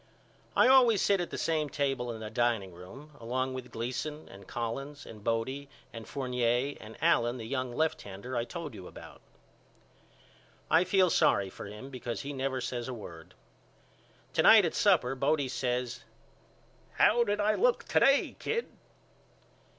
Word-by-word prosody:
I - - +6
always 250 -5 +6
sit 200 -1 +2
at 175 - -4
the - - -5
same 155 -2 0
table 135 -4 -1
in 110 -1 -7
the 110 -1 -6
dining 115 -6 0
room 95 - -12
along 130 +3 -2
with 130 -1 -7
Gleason 130 +7 -4
and 95 0 -13
Collins 135 +5 -5
and 105 -2 -11
Bodie 130 +5 -2 0.2
and 115 -1 -8
Fournier 125 0 0
and 110 +1 -11
Allen 120 +2 +3
the 115 - -7
young 130 +1 -2
lefthander 130 -7 -3
I 120 - +1
told 160 +1 -7
you 95 -4 -9
about. - - -12 1.5
I 165 +3 +5
feel 185 -1 +3
sorry 95 -1 +3
for - - -9
him 105 +7 -9
because 120 -2 -5
he 145 +1 -5
never 135 -1 -2
says 120 -1 -4
a 130 - -4
word. 85 -7 -11 1.0
To - - +3
night - - +8
at - - -1
supper 125 +2 +3
Bodie 140 +1 +1
says 125 -1 -2 0.9
How 235 +2 +4
did 205 -2 -1
I 210 +1 +3
look - - +2
to - - +4
day 275 +1 +3
Kid? 465 +1 -2
130 Hz, 160 wpm, -30 LUFS, 115-150 Hz, 1.5 s, night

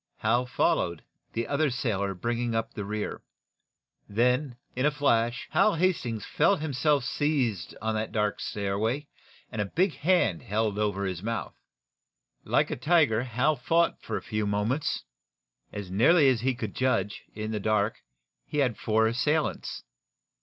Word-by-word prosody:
Hal 120 +3 +1
followed, 85 -8 +1 0.3
the 115 0 -2
other 150 +1 +1
sailor 100 -6 -1
bringing 120 +4 -1
up 115 - -2
the 105 - -4
rear. 105 +1 -4 0.9
Then, 125 +5 +1 0.2
like 130 +2 +1
a - - +5
flash, 120 -5 +1
Hal 215 - +4
Hastings 155 - 0
felt - - +2
him 150 -2 -3
self 145 +1 +2
seized 125 - -1
on 110 0 0
that 110 0 -2
dark 105 -1 0
stairway, 110 +7 -1 0.5
and 110 -3 -2
a - - 0
big 180 - +1
hand 170 - +2
held 105 0 -1
over 100 -2 0
his 90 -2 -3
mouth. 115 +2 -3 0.9
Like - - +1
a - - -2
tiger 145 -5 +3
Hal 130 +5 +1
fought 165 +6 +1
for - - -3
a - - -7
few 105 -1 -2
moments. 105 +8 0 0.7
As 100 -3 -6
nearly 140 - +5
as 125 -4 +1
he 130 0 +1
could - - -5
judge, 105 -6 0
in 110 +1 -4
the 105 - -1
dark, 110 +1 +1 0.5
he - - -4
had 125 -6 +2
four 110 0 +2
assailants. 145 +7 0
115 Hz, 155 wpm, -28 LUFS, 105-140 Hz, 0.9 s, a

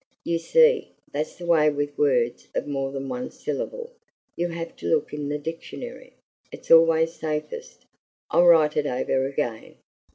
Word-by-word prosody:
You 170 0 0
see, 475 - +3 0.2
that's 150 +2 -3
the 175 - -9
way 160 -3 +4
with 145 0 -3
words 125 -5 +1
of - - -1
more 135 -2 -2
than 135 0 -5
one 250 - -4
syllable; - - -5 0.4
you 175 - -1
have 165 -1 -6
to - - -6
look 85 - +1
in 145 -1 -4
the 145 - -1
dictionary. 165 - -8 0.4
It's - - -9
always 165 0 +6
safest. 160 - -5 0.5
I'll 175 - +5
write 155 -3 +6
it 150 -1 +1
over 130 +1 0
again." 120 -5 -4
155 Hz, 160 wpm, -24 LUFS, 145-170 Hz, 0.5 s, always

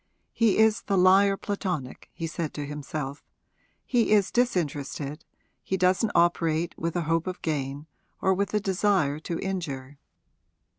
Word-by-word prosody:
'He 225 -4 +3
is 220 -1 +4
the 195 - 0
liar 195 +2 +5
platonic,' 180 -11 -4
he 165 - -5
said 165 -1 -4
to 145 - -4
himself; 145 -1 -5 0.6
'he 240 -4 +2
is 205 -3 +4
disinterested, 150 - -1 0.4
he 190 - -2
doesn't 185 +4 +2
operate 170 -1 +2
with 165 +1 -3
a 175 - +1
hope 165 +2 0
of 185 - -5
gain 145 -2 -2 0.3
or 190 - +3
with 200 +2 -1
a - - +4
desire 190 -7 +1
to 165 +1 -4
injure. 145 -8 -4
175 Hz, 145 wpm, -27 LUFS, 150-195 Hz, 0.6 s, liar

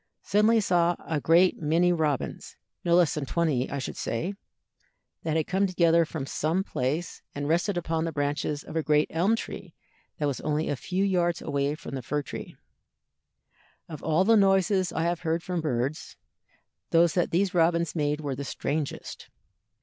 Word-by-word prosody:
Suddenly 210 +3 +3
I - - +3
saw 175 -2 +2
a 155 -3 -1
great 175 +3 +4
many 165 +4 +3
robins 150 -6 -2 0.3
not 170 0 +3
less 175 -3 +4
than 145 -3 -3
twenty, 150 -7 0
I 140 - -3
should 135 - -5
say 165 - -2 0.9
that 160 -1 -1
had 155 - +1
come 195 +2 +1
together 170 -2 +3
from 155 -4 -5
some 160 +7 -1
place, 155 +1 -3
and 145 0 -3
rested 175 +4 +1
upon 165 -1 -1
the 165 - -2
branches 145 0 -2
of - - -10
a 160 - +2
great 150 0 +2
elm 185 +7 +2
tree 185 -5 -7 0.4
that 150 - -1
was 140 -3 -2
only 155 +1 -1
a 145 - 0
few 185 +8 -2
yards 175 -3 +1
away 140 +1 -1
from 155 - -9
the 135 - -3
fir 145 +4 -2
tree. - - -8 1.3
Of 155 -3 -8
all 160 +3 +2
the 225 +3 +5
noises 195 -2 +3
I 160 - -1
ever 175 0 -1
heard 165 0 -1
from 180 -2 -2
birds, 135 0 -2 0.7
those 170 0 +4
that 175 - +1
these 185 +2 +1
robins 170 -1 +2
made 150 -1 -1
were 145 -2 -3
the 140 - -5
strangest. 145 +1 -4
165 Hz, 180 wpm, -27 LUFS, 150-175 Hz, 1.3 s, the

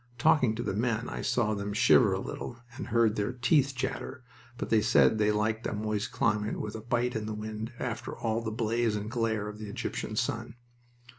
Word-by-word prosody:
Talking 130 -4 +4
to 120 - -3
the - - -2
men, 115 +2 0
I - - -4
saw 120 -4 +1
them 100 0 -3
shiver 110 0 +5
a 95 - 0
little 115 - -6 0.2
and 140 - -6
heard 115 -2 +3
their 105 +2 0
teeth 135 +2 +2
chatter, 130 - -4 0.3
but - - -5
they 110 -1 +5
said 110 +1 +4
they 105 0 +4
liked 110 +2 0
a - - -3
moist 105 0 -2
climate 105 -1 0
with 105 - -4
a 110 - -6
bite 120 +2 0
in 110 -1 -2
the 110 - -3
wind, 110 +1 -5
after 120 -1 -4
all 115 0 -1
the 115 - -3
blaze 115 0 0
and 105 +1 -4
glare 110 -3 0
of 105 0 -7
the 105 -1 -6
Egyptian - - -4
sun. 115 - -2
110 Hz, 210 wpm, -29 LUFS, 105-120 Hz, 0.3 s, shiver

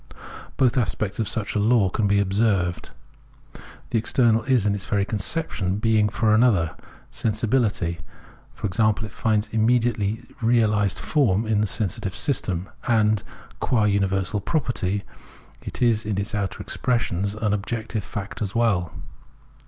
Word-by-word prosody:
Both 130 -1 +3
aspects 110 -3 -2
of 110 - 0
such 110 -4 -2
a 105 - 0
law 105 -3 +3
can 105 +1 0
be 100 0 +3
observed. 100 -3 0 1.0
The 115 - +2
external 115 0 +2
is 130 -6 +2
in 105 - +2
its 100 -2 -4
very 100 -1 +1
conception 100 - -1
being 110 -1 +2
for 110 0 +1
another; 105 -9 +3 0.4
sensibility, 105 -6 0 0.6
e.g., 110 +2 +1
finds 110 0 0
its 105 - -18
immediately 115 -1 +1 0.2
realised 110 -4 +2
form 115 -8 +1
in 110 -1 +1
the 105 - +1
sensitive 95 -2 -2
system; 95 -9 -1 0.2
and, 110 -3 +3 0.4
qua 115 -4 +1
uni 100 -1 +2
versal 95 +1 -2
property, 105 - -1 0.6
it - - -4
is 115 -2 +3
in 105 -2 -2
its 100 +3 -3
outer 100 -3 -2
expressions 100 -5 -1
an 105 -1 0
objective 110 +1 -3
fact 100 +2 -6
as 100 -2 -3
well. 100 -8 +1
105 Hz, 140 wpm, -24 LUFS, 100-115 Hz, 1.0 s, Both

